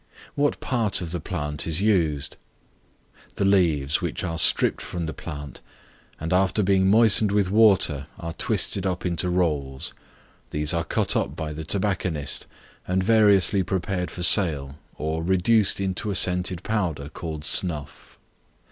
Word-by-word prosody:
What 145 0 0
part 115 -7 0
of 85 -2 -5
the 90 - -3
plant 75 0 -3
is 80 +1 +2
used? 85 -9 0 1.0
The 100 - -1
leaves, 85 -6 +2
which 85 0 -3
are 85 -2 -3
stripped - - +2
from 85 -1 -5
the 80 - -5
plant, 70 -1 -8 0.6
and 80 +2 -3
after 95 +3 +2
being 95 0 +2
moistened 110 -1 +5
with 100 -2 +1
water, 95 -10 +3
are 85 -3 -6
twisted 95 +4 -1
up 90 0 -3
into 90 0 -1
rolls; 75 -7 -2 0.6
these 75 +2 -1
are 85 0 0
cut - - +1
up 70 - -1
by 80 -1 -5
the 80 +1 -7
tobacconist, 90 -5 -2 0.4
and 95 +1 0
variously 100 -2 +4
prepared 90 0 -3
for 90 - -5
sale, 75 -8 +3 0.2
or 80 +1 -3
reduced 95 +5 +2
into 95 +2 -3
a 100 - -2
scented 90 -1 +1
powder 85 -10 -2
called 80 -1 -7
snuff. 75 -1 -1
90 Hz, 145 wpm, -24 LUFS, 75-95 Hz, 1.0 s, moistened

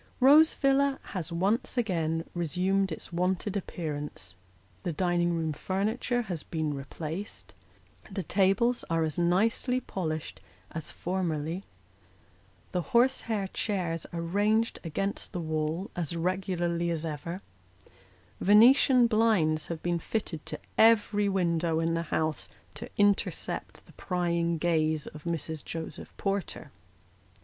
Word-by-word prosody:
Rose 295 +5 +7
Villa 275 0 +3 0.2
has 180 -4 -3
once 195 +9 0
again 165 -7 0
resumed 185 +3 0
its 160 - -7
wonted 185 +3 0
appearance; 150 - -5 0.5
the 175 - -2
dining 175 +1 +1
room 160 -2 -1
furniture 215 - -1
has 180 -7 -4
been 155 -2 -2
replaced; 155 +7 -6 0.6
the 195 - -4
tables 195 +7 +2
are 165 -1 +2
as 155 +1 -2
nicely 220 +8 +2
polished 160 -9 -4 0.3
as 160 -1 -5
formerly; 175 -1 -2 1.1
the 180 - 0
horsehair 235 -2 +2
chairs 180 -7 -2
are 170 -1 -5
ranged 210 +6 +1
against 195 +7 -3
the 180 - -2
wall, 160 +3 -2
as 170 -2 -2
regularly 175 -1 -1
as 165 -1 -1
ever; 165 +4 -5 1.0
Venetian 245 +5 +6
blinds 215 -10 +2
have 165 -2 -5
been 175 -1 0
fitted 165 -6 -3
to - - -5 0.2
every 210 -2 +5
window 170 -3 +1
in 165 0 +1
the 165 - 0
house 155 -2 -1 0.2
to - - -7
intercept 205 -1 0
the - - -18
prying 170 -2 0
gaze 155 -2 +1
of 150 +1 -10
Mrs. 160 -2 -3
Joseph 165 -1 -6
Porter. 195 -2 -3
175 Hz, 120 wpm, -29 LUFS, 165-205 Hz, 1.1 s, Rose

